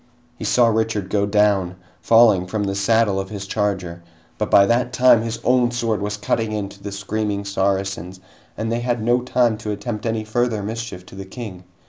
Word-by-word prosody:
He - - -7
saw 120 -2 +4
Richard 110 -3 -1
go 100 -1 +1
down, 100 -3 +2 0.3
falling 110 -6 +5
from 105 +2 -2
the 100 -1 -1
saddle 100 0 +2
of 95 0 -5
his 100 -2 -6
charger, 95 -4 -2 0.4
but - - -1
by 100 - +6
that 120 +3 +1
time 125 -3 +5
his 115 0 -4
own 125 -1 +3
sword 115 -3 -1
was 105 0 -3
cutting 110 +1 -1
into 100 -1 -5
the 100 - -6
screaming 100 +1 -3
Saracens 95 -2 -2 0.4
and 110 +1 -2
they 115 - 0
had 120 0 -1
no 120 +2 +2
time 120 -3 +1
to 110 - -6
attempt 110 +1 -4
any 110 -1 -1
further 110 -1 -1
mischief 110 -4 -6
to - - -15
the 95 0 -8
King. 95 -4 -9
105 Hz, 190 wpm, -21 LUFS, 100-115 Hz, 0.4 s, by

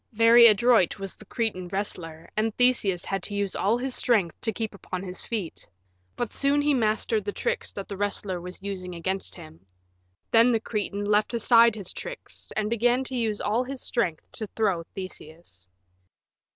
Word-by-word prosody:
Very 230 +2 +8
adroit 220 -3 +4
was 195 -1 -6
the 215 - -14
Cretan 210 -7 -2
wrestler, 175 -4 -5
and 220 0 -1
Theseus 225 -8 +2
had 195 -1 -2
to 205 - -5
use 200 -1 -1
all 210 +5 +2
his 260 +1 -2
strength 205 -11 +1
to 225 - 0
keep 220 0 -4
upon 185 -2 -6
his 180 -2 -6
feet; 205 -8 -4 0.5
but 240 - -3
soon 280 +1 +3
he 290 0 +2
mastered 220 -2 +1
the 205 - -3
tricks 475 - -2
that 200 - -6
the 200 - -5
wrestler 200 -2 -2
was 180 +2 -9
using 185 -3 -5
against 190 +3 -2
him. 160 - -13 0.7
Then 235 +2 +6
the 225 - +2
Cretan 205 -2 -3
left 210 +3 +2
aside 230 0 +5
his 200 -4 -4
tricks - - -8
and 215 -1 +1
began 240 +3 +2
to 260 0 -5
use 220 -4 -1
all 225 +4 +1
his 265 +1 -6
strength 180 -10 0
to 215 - -4
throw 200 -6 +1
Theseus. 160 - -8
210 Hz, 180 wpm, -26 LUFS, 185-235 Hz, 0.7 s, Very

